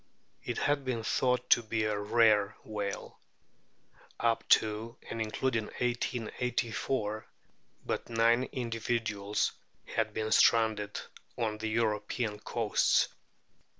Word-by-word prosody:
It 120 - -3
had 145 -1 +1
been 125 -4 -2
thought 125 +3 +1
to - - +7
be 110 -1 -1
a 105 -1 0
rare 105 -1 +3
whale. 105 -2 -5 1.0
Up 115 -1 0
to 110 +2 +2
and 115 - -3
including 115 +1 -1
1884 120 -2 -2 0.6
but - - -3
nine 115 +2 +3
individuals 115 -4 -1 0.3
had 110 -1 -1
been 110 0 -3
stranded 110 -3 +3 0.4
on 110 -2 -1
the 110 0 -2
European 110 0 -1
coasts. 115 0 +2
115 Hz, 105 wpm, -31 LUFS, 105-120 Hz, 1.0 s, to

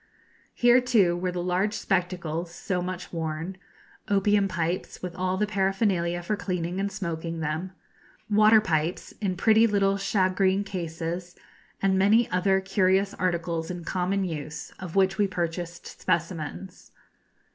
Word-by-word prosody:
Here, 245 +1 +5
too, 205 -8 +3
were 180 +1 -2
the 175 -1 -3
large 185 +4 0
spectacles 175 -4 -2
so 180 +1 -3
much 180 0 -5
worn; 165 +3 -3 0.5
opium 205 0 +3
pipes, 175 0 -3
with 180 -1 -5
all 185 0 -1
the 210 - +2
paraphernalia 195 -4 0
for 210 +5 -1
cleaning 180 -2 -3
and 200 +1 -1
smoking 165 -4 -4
them; 160 +4 -3 0.5
water 215 +1 +6
pipes 165 -4 -1
in 185 -3 -1
pretty 220 +3 +5
little 200 -2 +2
shagreen 195 -1 +2
cases, 175 -1 -4 0.5
and 190 -1 +3
many 215 +4 +4
other 190 +1 +3
curious 190 +1 +2
articles 170 -2 -1
in 175 -1 -5
common 190 +2 0
use, 155 -4 -5
of 180 -2 -7
which 190 0 +3
we 205 - +4
purchased 175 -1 -5
specimens. 170 +2 -3
185 Hz, 135 wpm, -26 LUFS, 170-195 Hz, 0.5 s, water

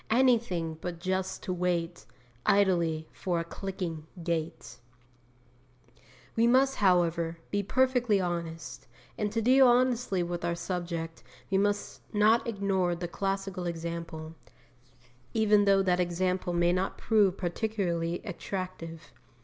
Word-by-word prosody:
Anything 220 -10 +2
but 175 -2 -5
just 190 +1 -2
to 185 - -2
wait 175 -6 -2 0.4
Idly 170 -5 +2
for 175 -3 -1
a - - -1
clicking 170 -3 -5 0.2
gate! 160 -8 -3 1.6
We 230 +1 +4
must, 265 +2 +4
however, 170 -3 +2
be 205 - +1
perfectly 245 -1 +2
honest; 165 -7 -4 0.3
and 210 -1 -2
to 225 0 -1
deal 260 +2 +6
honestly 245 -6 +2
with 175 0 -4
our 170 0 0
subject 170 -2 -4 0.3
we 190 - +3
must 205 0 -1
not 215 +3 +4
ignore 195 -5 0
the 175 +1 -4
classical 195 -1 -3
example, 165 -1 -5 1.0
even 210 -2 +4
though 195 -1 +4
that 180 -1 +2
example 180 +1 0
may 175 0 +2
not 185 +1 -1
prove 205 -4 +3
particularly 175 -3 -1
attractive. 180 -3 -6
180 Hz, 120 wpm, -29 LUFS, 170-205 Hz, 1.6 s, deal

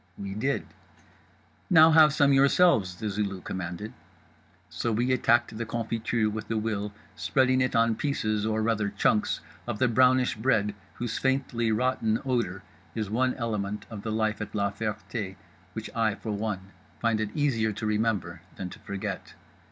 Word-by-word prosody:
We 100 -1 -5
did. 135 +7 -1 1.0
Now 160 -2 +8
have 155 -2 +7
some 140 -1 +4
yourselves, 135 - +4
The 110 +3 -4
Zulu 100 -1 -2
commanded. 90 +4 -5 0.7
So 80 +8 -2
we 120 +4 +1
attacked 120 -2 +2
the 115 +1 -3
confiture 115 -1 -1
with 110 0 -4
a 115 - 0
will, 105 -2 -2 0.2
spreading 130 0 +2
it 130 -2 0
on 115 0 +4
pieces 110 -5 -1
or, 110 0 0
rather, 110 -2 +1
chunks 105 +1 +1 0.3
of 120 -3 -2
the 130 - +3
brownish 130 +1 +4
bread 105 -3 +1 0.2
whose 120 -1 -3
faintly 130 -4 0
rotten 115 -1 +1
odour 115 -8 -1 0.3
is 110 -3 -3
one 125 +3 +1
element 105 -4 -3
of 105 -2 -6
the 110 - -4
life 110 -1 0
at 105 0 -6
La 100 -1 +1
Ferté 105 -1 -4 0.4
which 110 +2 -6
I, 110 -2 +1
for 110 - -5
one, 100 -2 -3 0.3
find 115 -2 +1
it 110 - -1
easier 115 -7 +1
to 105 +2 -5
remember 105 -6 -1
than 90 -2 -6
to - - -11
forget. 100 -1 -5
110 Hz, 160 wpm, -27 LUFS, 105-120 Hz, 1.0 s, Now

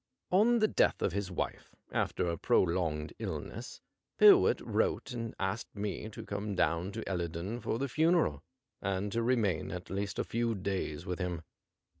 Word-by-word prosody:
On 220 +6 +5
the 215 -1 +4
death - - +2
of - - +1
his 100 -1 -2
wife^ 90 - -3 0.3
after - - 0
a 85 - 0
prolonged 85 -2 +1
illness, - - -5 0.4
Pyrwhit - - +7
wrote - - 0
and 115 -2 -4
asked 100 +4 -3
me 105 +1 -3
to 105 - -9
come 100 0 -3
down 85 +3 +1
to - - -5
Ellerdon 90 +4 -3
for 115 - -1
the 140 +3 -1
funeral, 155 - +2 0.4
and 100 +1 -1
to 115 - 0
remain 110 -9 +1
at 90 0 -6
least 100 0 -2
a - - +1
few 115 0 -1
days 95 -6 -3
with 90 0 -3
him. 90 -3 -2
100 Hz, 165 wpm, -32 LUFS, 90-115 Hz, 0.4 s, Pyrwhit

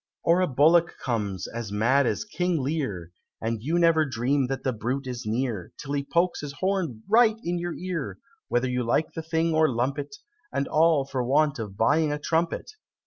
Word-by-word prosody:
Or 170 +2 +4
a 185 - +2
bullock 165 +5 +4
comes, 105 -6 -2
as 115 -3 -6
mad 120 +6 +3
as 105 - -1
King 175 +1 -1
Lear, 130 - -3 0.3
And 115 -1 -2
you 160 +8 0
never 165 -2 +4
dream 130 0 0
that 135 +1 -4
the 130 - 0
brute 125 +5 -3
is 125 -3 -5
near, 115 -5 -2
Till 140 0 -6
he 140 -1 0
pokes 170 +5 0
his 145 -2 -6
horn 180 - -2
right 220 0 +5
into 175 0 -2
your 175 -1 -3
ear, 180 -5 -4 0.3
Whether 120 +1 +1
you 125 0 -1
like 135 +7 0
the 160 - -4
thing 160 +1 0
or 155 0 +4
lump 130 +4 -1
it, 145 +8 -6 0.4
And 140 - -1
all 155 -3 +3
for 135 -2 -2
want 145 +2 +2
of 100 -3 -6
buying 145 +7 +3
a 150 - -1
trumpet! 165 +3 -1
140 Hz, 195 wpm, -26 LUFS, 120-165 Hz, 0.4 s, right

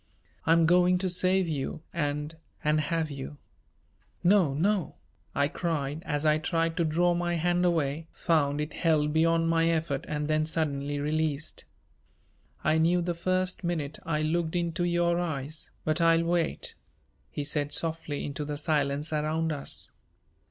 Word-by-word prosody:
"I'm 165 0 +5
going 180 +2 +5
to 185 0 -1
save 185 +1 +2
you 155 +1 -3
and 150 -1 -2 0.3
and 150 +1 +3
have 160 0 -1
you." 140 +1 -7 0.9
"No, 175 -7 +4
no!" 190 +3 +1 0.4
I 140 +1 +3
cried, 150 -2 -2
as 145 0 -1
I 155 0 +4
tried 165 0 0
to 170 - +3
draw 175 +3 +2
my 175 0 0
hand 175 +2 +1
away, 160 -2 0
found 150 -4 +1
it 150 - -4
held 150 -3 +2
beyond 165 +1 +3
my 165 0 +3
effort 160 -4 -1
and 150 -1 -2
then 155 0 +1
suddenly 145 -3 -1
released. 155 0 -2 1.0
"I 155 +1 +3
knew 175 +2 +3
the 175 0 -1
first 185 +2 -1
minute 155 -4 -2
I 155 -2 -1
looked 160 +1 0
into 175 0 0
your 175 0 +2
eyes, 155 -3 -4 0.2
but 155 +2 +1
I'll 165 0 +5
wait," 170 0 -1 0.6
he 145 - -4
said 145 0 -1
softly 160 -2 -2
into 145 +1 -4
the 145 0 -4
silence 150 0 0
around 155 +2 0
us. 145 -2 -5
160 Hz, 150 wpm, -28 LUFS, 150-170 Hz, 1.0 s, I'm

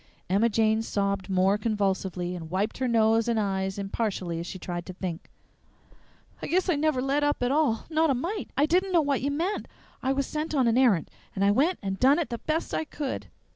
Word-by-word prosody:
Emma 210 +5 +3
Jane 220 0 +2
sobbed 200 -3 -1
more 190 +2 +3
convulsively, 195 -4 -1
and 165 -2 -7
wiped 200 +7 -1
her 260 - 0
nose 225 -1 +3
and 230 -2 +1
eyes 190 -1 -1
impartially 195 -4 -2
as 170 - -5
she 185 - -6
tried 175 -1 -5
to 185 - -6
think. 180 -3 -5 1.1
"I - - -4
guess 370 +2 +1
I - - +2
never 290 -3 +1
led 280 +2 +1
up 290 -3 +1
at 245 - +1
all; 280 -7 +1
not 320 0 +2
a 275 - +3
mite. 350 - -3
I 285 - +5
didn't 370 +4 +1
know 340 - +5
what 280 -2 0
you 280 - 0
meant. 340 +8 -2 0.3
I 265 - 0
was 275 0 0
sent 310 +2 -3
on 260 -4 +3
an 230 - +3
errant, 240 -10 +3 0.2
and 195 - +1
I 200 - +5
went 300 - +2
and 195 -1 -3
done 270 +3 +5
it 335 -6 -2
the 235 - -3
best 315 +1 -2
I - - 0
could! 290 -3 -5
230 Hz, 220 wpm, -27 LUFS, 195-290 Hz, 1.1 s, I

